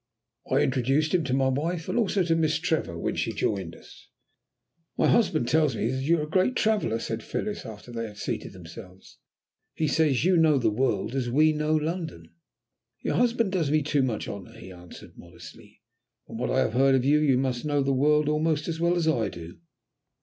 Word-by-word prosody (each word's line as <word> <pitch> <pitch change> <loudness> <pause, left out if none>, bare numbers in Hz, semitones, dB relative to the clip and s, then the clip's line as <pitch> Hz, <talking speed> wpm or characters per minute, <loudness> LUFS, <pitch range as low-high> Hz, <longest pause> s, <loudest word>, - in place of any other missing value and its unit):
I - - +2
introduced 135 +5 +1
him 180 -3 +2
to 130 - -2
my 135 -1 +2
wife, 160 +5 -2
and - - -3
also 200 -3 +1
to 165 -1 +1
Miss 160 -1 +1
Trevor 160 - -2
when - - -2
she - - -1
joined 95 -5 -2
us. - - -17 0.9
"My - - +2
husband 180 - +2
tells 155 +1 +2
me 115 - -1
that 130 0 -3
you 165 +5 +2
are 150 - -2
a - - -5
great 185 +10 +1
traveller," 215 - +1
said 115 0 -4
Phyllis, 205 - -4
after 110 +2 -10
they 115 -1 -4
had 105 -1 -13
seated - - -4
themselves. 90 +2 -13 0.6
"He 155 - 0
says 145 -2 +2
you 185 -1 +4
know 160 -3 +4
the 120 - +1
world 110 -2 -1
as 130 -3 -2
we 155 +5 +3
know 150 +1 0
London." 155 - -4 0.7
"Your - - -1
husband 235 -4 +1
does 170 -6 0
me 155 0 +2
too 145 -1 +1
much 125 -4 -2
honour," 100 -2 -8
he 95 - -11
answered 90 -1 -13
modestly. - - -14 0.4
"From - - -9
what - - -2
I - - +2
have - - 0
heard 135 +2 +4
of 130 -1 +1
you, 150 +2 +4
you 140 -4 +3
must 130 -2 -1
know 145 -2 0
the 135 0 +1
world 150 +3 +2
almost 150 0 0
as 165 -1 -3
well 170 +1 +2
as 170 -2 0
I 120 -8 +1
do. 85 +2 -10
145 Hz, 210 wpm, -26 LUFS, 120-160 Hz, 0.9 s, you